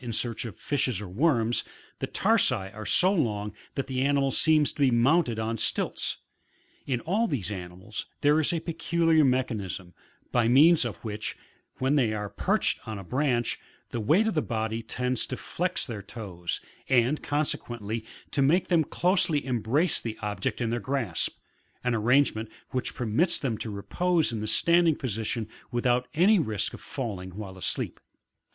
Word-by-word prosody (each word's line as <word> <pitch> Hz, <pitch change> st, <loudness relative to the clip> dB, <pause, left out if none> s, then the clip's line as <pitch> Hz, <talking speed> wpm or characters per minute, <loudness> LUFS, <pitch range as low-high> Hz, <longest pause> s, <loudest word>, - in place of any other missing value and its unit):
in 120 Hz, -, -4 dB
search 115 Hz, +1 st, -1 dB
of 115 Hz, -, -7 dB
fishes 130 Hz, -7 st, 0 dB
or 105 Hz, -, -6 dB
worms, 120 Hz, -, +1 dB, 0.4 s
the -, -, -2 dB
tarsi -, -, +3 dB, 0.2 s
are 110 Hz, 0 st, -7 dB
so 185 Hz, +2 st, +5 dB
long 105 Hz, -, -1 dB, 0.2 s
that 135 Hz, -, -1 dB
the 130 Hz, -1 st, -2 dB
animal 140 Hz, 0 st, +2 dB
seems 155 Hz, -1 st, +3 dB
to -, -, -17 dB
be 140 Hz, -2 st, +5 dB
mounted 125 Hz, +1 st, +3 dB
on 110 Hz, +1 st, -1 dB
stilts. -, -, 0 dB, 0.7 s
In 125 Hz, -4 st, 0 dB
all 210 Hz, -, +1 dB
these 110 Hz, -, -2 dB
animals 95 Hz, +2 st, -6 dB
there 145 Hz, +2 st, +4 dB
is 160 Hz, -, +2 dB
a 170 Hz, -2 st, -1 dB
peculiar 165 Hz, -1 st, +2 dB
mech 130 Hz, -1 st, +2 dB
anism, 95 Hz, -5 st, -5 dB, 0.4 s
by 120 Hz, -2 st, +3 dB
means 150 Hz, +5 st, +6 dB
of 120 Hz, 0 st, -6 dB
which, 105 Hz, 0 st, -4 dB, 0.4 s
when 135 Hz, +3 st, +2 dB
they 115 Hz, -6 st, +2 dB
are 105 Hz, -1 st, -3 dB
perched -, -, +1 dB
upon 110 Hz, -2 st, -7 dB
a 100 Hz, -, -7 dB
branch, 125 Hz, +2 st, 0 dB, 0.3 s
the 120 Hz, -, -2 dB
weight 160 Hz, -, +3 dB
of 220 Hz, -, 0 dB
the 155 Hz, -, +1 dB
body 110 Hz, -2 st, -2 dB
tends 125 Hz, +1 st, -1 dB
to 130 Hz, -, -4 dB
flex 180 Hz, +1 st, -2 dB
their 110 Hz, -5 st, -6 dB
toes, 95 Hz, -5 st, -5 dB, 0.3 s
and 130 Hz, +3 st, +3 dB
consequently 120 Hz, -7 st, -2 dB, 0.3 s
to 140 Hz, -, +1 dB
make 160 Hz, +7 st, +3 dB
them 170 Hz, -3 st, +4 dB
closely 175 Hz, -2 st, +1 dB
embrace 130 Hz, +7 st, +1 dB
the 115 Hz, -2 st, -5 dB
object 105 Hz, 0 st, -2 dB
in 115 Hz, -1 st, 0 dB
their 120 Hz, -, 0 dB
grasp; 120 Hz, -8 st, -2 dB, 0.5 s
an 125 Hz, -1 st, +1 dB
arrangement 115 Hz, -1 st, +2 dB, 0.2 s
which 125 Hz, -, -2 dB
permits 125 Hz, -, +1 dB
them 125 Hz, -5 st, -2 dB
to 110 Hz, -, -5 dB
repose 165 Hz, -, 0 dB
in 110 Hz, -, -3 dB
the 110 Hz, -, -3 dB
standing 170 Hz, +7 st, +4 dB
posi 115 Hz, -6 st, -3 dB
tion 115 Hz, -3 st, -2 dB, 0.2 s
without 125 Hz, +1 st, +1 dB
any 195 Hz, +6 st, +5 dB
risk 110 Hz, -8 st, -1 dB
of -, -, -9 dB
falling 100 Hz, -9 st, -5 dB
while 100 Hz, -3 st, -7 dB
asleep. 95 Hz, -, -2 dB
125 Hz, 170 wpm, -27 LUFS, 110-150 Hz, 0.7 s, means